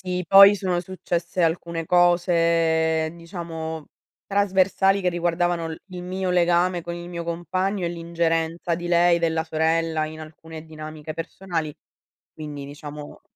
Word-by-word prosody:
Sì, 180 -1 -3
poi 195 +1 +9
sono 185 -3 -1
successe 180 -1 -3
alcune 165 0 -1
cose, 165 -2 +2
diciamo 165 -2 -6 0.4
trasversali, 195 0 +2
che 185 - +1
riguardavano 175 -1 0
il 160 0 -7
il 180 -2 -8
mio 185 +1 -3
legame 175 0 +2
con 170 0 -5
il 175 0 -8
mio 170 -1 -5
compagno 185 +3 -2
e 170 - 0
l'ingerenza 170 0 -1
di 175 +1 -6
lei, 175 0 +4
della 160 -1 0
sorella 160 0 0
in 155 0 -8
alcune 160 0 -10
dinamiche 155 -1 -8
personali. 165 -2 -4 0.6
Quindi 150 -2 -7
diciamo 145 +1 -9
170 Hz, 135 wpm, -23 LUFS, 160-180 Hz, 0.6 s, poi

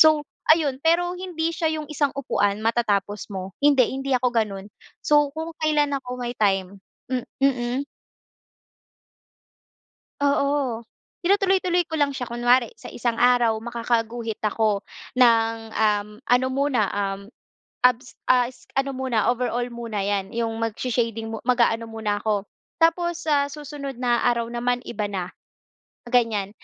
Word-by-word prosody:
So, 310 -1 +6 0.3
ayun 295 -5 +2
pero 350 +2 +3
hindi 335 -3 -2
siya 320 -1 +1
yung 305 -1 -6
isang 290 -2 0
upuan 205 -7 0
matatapos 210 -3 0
mo 190 -1 -6
hindi, 285 -3 +5
hindi 270 0 -3
ako 250 0 +3
gano'n. 210 -4 -1 0.3
So, 295 -1 +3
kung 320 +1 -6
kailan 295 -2 +2
ako 255 -2 -7
may 240 0 -3
time 195 -2 +1 0.3
m 255 -1 0 0.2
mm. 260 0 +1 2.4
Oo, 280 -4 +1 0.4
tinutuloy-tuloy 370 -2 +2
ko 315 - -1
lang 280 -1 +2
siya 250 - -3
kunwari 240 0 +3
sa - - -10
isang 235 -1 -2
araw 245 -2 +5
makakaguhit 230 -1 -2
ako 215 -1 +1 0.4
ng, 230 -2 +5 0.2
um, 210 -1 +2 0.2
ano 250 +1 +3
muna, 265 -2 +1
um, 195 -1 -2 0.7
abs 250 0 -1
a 250 -1 +4
es 255 - -20
ano 270 0 +1
muna 255 -5 0
overall 245 0 -1
muna 230 -4 -4
'yan, 200 0 -2
yung 225 -1 -2
magsha-shading 230 0 -2
mu 225 - -4
mag-aano 235 -2 +2
muna 220 -2 -2
ako. 210 -1 0 0.4
Tapos 345 +1 +2
sa 290 -3 +2
susunod 285 -2 -7
na 240 -1 +1
araw 235 -1 +1
naman 245 +1 -1
iba 210 -4 -3
na, 190 -3 -4 0.8
ganyan. 225 -5 +2
245 Hz, 135 wpm, -24 LUFS, 225-280 Hz, 2.4 s, So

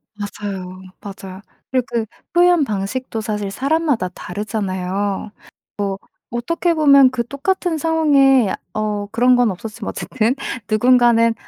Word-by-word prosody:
맞아요, 200 -3 -6 0.2
맞아. 195 -1 -9 0.3
그리고 255 -2 +1
그 230 -2 0 0.3
표현 350 -2 +4
방식도 220 +2 -3
사실 210 -2 -3
사람마다 275 - 0
다르잖아요. 195 +1 -3 1.0
뭐 240 - -4
어떻게 335 +7 0
보면 280 -4 +6
그 240 -2 -3
똑같은 340 +5 -1
상황에 280 -8 +3 0.2
어 210 -1 -2
그런 245 +2 +4
건 245 -3 +3
없었지만 215 +3 -7
어쨌든 240 +1 -1 0.3
누군가는 230 0 +4
230 Hz, 275 characters per minute, -19 LUFS, 205-270 Hz, 1.0 s, 보면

